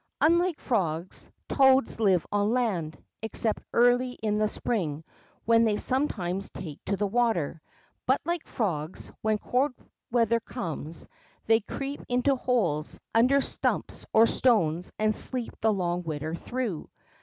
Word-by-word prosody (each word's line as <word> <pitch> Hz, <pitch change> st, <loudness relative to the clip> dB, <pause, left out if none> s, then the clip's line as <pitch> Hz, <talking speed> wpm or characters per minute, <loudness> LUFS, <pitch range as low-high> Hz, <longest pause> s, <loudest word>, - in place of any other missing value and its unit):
Unlike 340 Hz, +1 st, +3 dB
frogs, 180 Hz, -, -2 dB, 0.2 s
toads 265 Hz, -4 st, +4 dB
live 190 Hz, -6 st, +3 dB
on 205 Hz, 0 st, +1 dB
land, 195 Hz, -11 st, -1 dB, 0.2 s
except 220 Hz, 0 st, 0 dB
early 245 Hz, +1 st, +3 dB
in 210 Hz, -3 st, -1 dB
the 215 Hz, -, +3 dB
spring, 165 Hz, -9 st, -2 dB, 0.4 s
when 230 Hz, 0 st, +5 dB
they 215 Hz, -2 st, +2 dB
sometimes 195 Hz, -9 st, -1 dB
take 155 Hz, -5 st, -8 dB
to 200 Hz, -, -1 dB
the 210 Hz, -, 0 dB
water. 200 Hz, -8 st, 0 dB, 0.5 s
But 260 Hz, +2 st, +3 dB
like 340 Hz, 0 st, -2 dB
frogs, 170 Hz, -7 st, -3 dB
when 215 Hz, -1 st, +1 dB
cold 255 Hz, +6 st, 0 dB, 0.4 s
weather 230 Hz, -1 st, +2 dB
comes, 165 Hz, -, -5 dB, 0.4 s
they 225 Hz, 0 st, +5 dB
crec]) 275 Hz, +6 st, -5 dB
into 250 Hz, +3 st, +2 dB
holes, 195 Hz, -, 0 dB
under 255 Hz, +5 st, +4 dB
stumps -, -, -2 dB
or 220 Hz, +1 st, +6 dB
stones, 180 Hz, -10 st, +2 dB
and 215 Hz, 0 st, +1 dB
sleep 250 Hz, -3 st, -2 dB
the 220 Hz, -, +3 dB
long 175 Hz, -3 st, -1 dB
winter 155 Hz, -1 st, -4 dB
through. 230 Hz, -1 st, -4 dB
220 Hz, 135 wpm, -27 LUFS, 175-250 Hz, 0.5 s, or